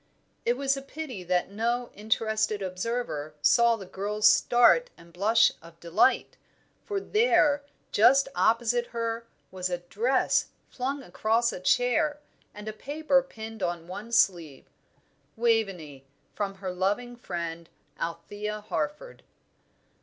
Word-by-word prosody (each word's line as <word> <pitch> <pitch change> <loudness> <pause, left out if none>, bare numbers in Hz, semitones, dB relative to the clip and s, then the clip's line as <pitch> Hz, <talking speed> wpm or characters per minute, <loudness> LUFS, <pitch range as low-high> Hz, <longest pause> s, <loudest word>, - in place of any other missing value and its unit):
It 240 +1 +2
was 275 0 +1
a 275 - -5
pity 275 -7 -7
that 180 +1 0
no 235 +3 -1
interested 215 -1 -1
observer 185 -5 -3
saw 235 +11 +5
the 200 -4 -9
girl's 205 +3 -3
start 245 - +5
and 170 0 -17
blush 205 +6 +4
of 165 0 -16
delight, 170 +9 +2 0.5
for 405 -2 -2
there, 390 -10 +3 0.3
just 270 +6 +5
opposite 240 +1 +2
her, 230 0 -3 0.2
was 185 -1 -3
a 175 - -1
dress, 225 +9 +1 0.2
flung 270 +2 -3
across 225 +4 +1
a - - -6
chair, 250 - +2 0.3
and 210 +1 -10
a 215 - -3
paper 285 +3 +1
pinned 225 -4 -9
on 175 -2 -2
one 205 +6 -8
sleeve. 170 - +1 0.7
"Waveney, 195 - -1 0.3
from 200 -2 -3
her 190 -1 -5
loving 205 +7 -1
friend, 170 -7 -5 0.3
Althea 205 +5 -4
Harford." 295 - -4
220 Hz, 125 wpm, -27 LUFS, 185-245 Hz, 0.7 s, saw